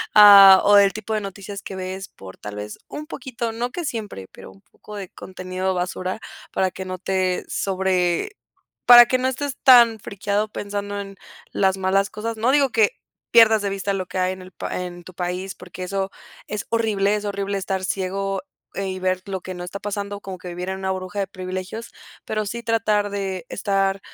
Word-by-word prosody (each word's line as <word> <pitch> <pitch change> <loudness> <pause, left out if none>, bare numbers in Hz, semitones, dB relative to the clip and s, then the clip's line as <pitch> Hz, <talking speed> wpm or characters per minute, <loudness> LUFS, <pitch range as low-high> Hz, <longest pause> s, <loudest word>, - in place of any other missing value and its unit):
ah, 200 -2 +10
o 205 0 +7
el 200 -1 +4
tipo 215 +1 -5
de 215 - 0
noticias 200 0 -7
que 190 - -7
ves 190 +1 -5
por 95 -1 -12
tal 105 0 -8
vez 105 0 -7
un 300 - -7
poquito, 245 -6 -5
no 235 +2 -3
que 345 +3 -4
siempre, 210 - -5
pero - - -12
un 95 +1 -20
poco 210 - -13
de 195 -3 -6
contenido 185 0 -4
basura 185 +2 -3 0.3
para 190 -1 0
que 190 - -7
no 185 0 -5
te 185 -1 -1
sobre 190 - 0 0.6
¿para 240 0 +11
que 255 +1 +1
no 255 - +1
estés 270 +1 -3
tan 235 -4 +7
frikeado 205 +1 -2
pensando 205 0 -4
en 195 0 -7 0.4
las 190 -1 +1
malas 195 +1 +1
cosas?, 225 +2 -4
no 225 +3 +1
digo 280 -1 +4
que 220 -3 +3 0.4
pierdas 225 -2 +7
de 200 - -1
vista 195 0 -2
lo 185 -2 -3
que - - -6
hay 185 0 +1
en 185 - -10
el 185 0 -12
p - - -7
en 175 -1 -5
tu 185 - -12
país, 180 +2 -3
porque 180 0 -9
eso 195 +1 -2 0.4
es 210 0 -4
horrible, 210 -3 +1
es 210 0 -4
horrible 200 0 -2
estar 190 0 -2
ciego 195 +1 -2 0.3
y 190 -1 -3
ver 185 0 -1
lo 190 -2 -4
que 185 0 -7
no 175 - -6
está 180 +3 -6
pasando, 205 0 -4
como 190 -2 -7
que 180 - -11
vivir 180 +1 -5
en 190 - -3
una 190 0 -1
burbuja 185 +1 -5
de 200 - +1
privilegios, 185 +4 -6 0.3
pero 215 -1 -2
sí 235 +4 -4
tratar 215 -2 +1
de 195 0 -3
estar 195 -1 0
195 Hz, 200 wpm, -22 LUFS, 185-210 Hz, 0.6 s, para